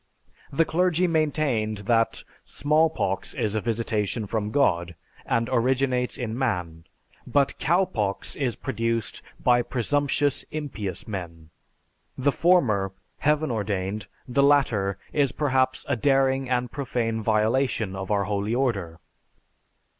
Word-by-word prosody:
The 165 +4 +2
clergy 180 +1 +2
maintained 150 -10 0
that 115 0 +1 0.2
"Smallpox 150 -8 0
is 105 - 0
a 110 - 0
visitation 110 -1 -1
from 105 0 -2
God, 85 - +1 0.3
and 115 0 +1
originates 125 0 +1
in 115 -3 -3
man, 90 -10 -2 0.4
but 140 -1 +1
Cowpox 140 - 0
is 130 -5 -1
produced 115 -3 -2 0.2
by 120 -1 +4
presumptious, 145 +3 0
impious 115 - -5
men. 85 -6 -7 0.7
The 140 +2 +2
former, 115 - +2 0.3
heaven 150 -1 +1
ordained, 100 -1 -2 0.2
the 130 +2 +2
latter 125 -9 +3 0.2
is 140 -4 +2
perhaps 130 -2 +1
a - - +1
daring 135 +1 +2
and 125 -1 0
profane 115 -5 -2
violation 110 -1 +1
of 95 0 -5
our 100 -2 +2
holy 100 +2 -1
order." 100 -11 -1
120 Hz, 115 wpm, -25 LUFS, 105-140 Hz, 0.7 s, by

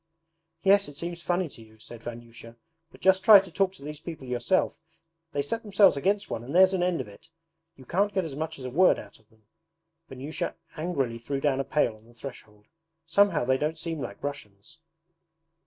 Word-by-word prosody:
'Yes, 200 +1 +5
it 145 - -11
seems 170 +1 -4
funny 175 +1 0
to 120 - -12
you,' 110 0 -17
said 115 +1 -11
Vanyusha, 115 0 -10 0.4
'but - - -17
just 190 0 +4
try 210 0 +10
to 190 -2 -8
talk 195 +1 +1
to 185 - -13
these 150 0 -7
people 160 -4 -8
yourself: 125 +9 0 0.5
they 145 -1 -1
set 225 +11 -3
themselves 200 -5 +4
against 200 +8 0
one 115 - -4
and 135 +7 -6
there's 190 +1 +6
an 185 - 0
end 180 -1 +1
of - - -8
it. 105 +10 -16 0.5
You 130 - -15
can't 200 +9 +1
get 190 -3 0
as 145 -4 -6
much 155 +2 -4
as 130 - -8
a 125 - -4
word 180 +7 +5
out 100 +1 -11
of 110 - -30
them.' 110 -1 -29 0.6
Vanyusha 135 +4 -4 0.2
angrily 140 -8 -2
threw 135 +4 -3
down 135 -1 +1
a - - +1
pail 135 -4 +1
on 110 +1 -20
the 120 +1 -20
threshold. 110 -5 -11 0.4
'Somehow 170 -4 +3
they 130 +1 +2
don't 155 +2 -1
seem 165 -2 -4
like 100 0 -7
Russians.' 145 0 -7
145 Hz, 205 wpm, -27 LUFS, 120-180 Hz, 0.6 s, try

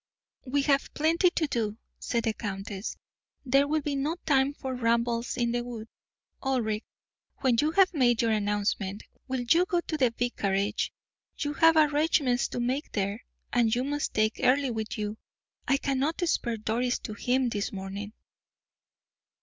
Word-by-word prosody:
"We 280 +2 +1
have 275 -1 +2
plenty 330 +4 +3
to 335 - 0
do," 225 -6 -2 0.2
said 235 -1 -1
the 225 - +1
countess; 195 -1 -5 0.5
"there 275 +2 +4
will 310 +1 +1
be 290 - -1
no 290 +4 -1
time 275 -1 +3
for 265 -2 -4
rambles 235 0 0
in 235 -1 +1
the 240 0 -1
wood. 230 -2 -7 0.5
Ulric, 235 -5 0 0.6
when 255 -4 +3
you 300 - +2
have 380 0 +5
made 240 -6 +3
your 230 - +2
announcement, 205 -1 -1 0.2
will 260 -1 -1
you 330 +9 +4
go 350 - +1
to 315 - -4
the 255 -4 +4
vicarage? 210 -4 -1 0.5
You 290 -1 -2
have 325 +2 +5
arrangements 295 -4 +3
to - - -5
make 255 +4 -1
there, 200 +3 -2 0.3
and 235 -2 +3
you 250 - 0
must 290 +2 -2
take 215 +1 +1
Earle 270 0 +3
with 220 -1 -4
you. 210 0 -4 0.5
I 275 - +4
cannot 275 +3 -1
spare 235 -7 0
Doris 235 +3 0
to 215 - -7
him 250 +4 +1
this 205 -2 -2
morning." 200 +2 -6
245 Hz, 160 wpm, -28 LUFS, 220-280 Hz, 0.6 s, have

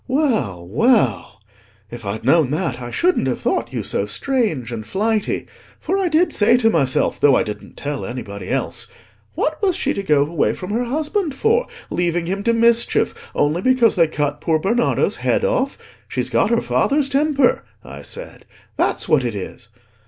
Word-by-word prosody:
Well, 230 - 0
well; 125 - +1 0.5
if 120 -2 -8
I'd 110 +3 -4
known 150 0 +4
that, 145 -5 -2
I 120 - -6
shouldn't 360 - +1
have - - -1
thought - - -1
you - - -3
so - - -1
strange 210 - -1
and 115 -2 -5
flighty. 215 - -1 0.3
For 380 - -2
I 380 - +1
did 335 +2 +2
say 225 +4 +4
to 225 -2 +3
myself, 135 -8 +1
though 140 -2 +5
I - - +3
didn't 105 -1 -8
tell 145 -1 -4
anybody 100 -5 -6
else, - - -2 0.5
'What 310 +3 -1
was 380 -4 +2
she - - 0
to 200 - -3
go 150 -6 +3
away 160 0 0
from 185 +1 -7
her 240 +3 0
husband 310 - -2
for, 460 - +1 0.2
leaving 175 -1 0
him 195 +3 -2
to 235 - +4
mischief, 235 - +2
only 150 +4 +1
because 255 -1 +3
they 165 -2 +4
cut 145 -1 -2
poor 160 -2 +2
Bernardo's 230 +9 +1
head - - +1
off? - - 0 0.3
She's - - -2
got - - +2
her - - +2
father's 285 0 +1
temper,' 280 -1 +2 0.2
I - - -10
said, - - -7 0.3
'that's - - 0
what 145 -4 +3
it 120 -3 -2
is. 115 +4 -7
195 Hz, 180 wpm, -20 LUFS, -, 0.5 s, though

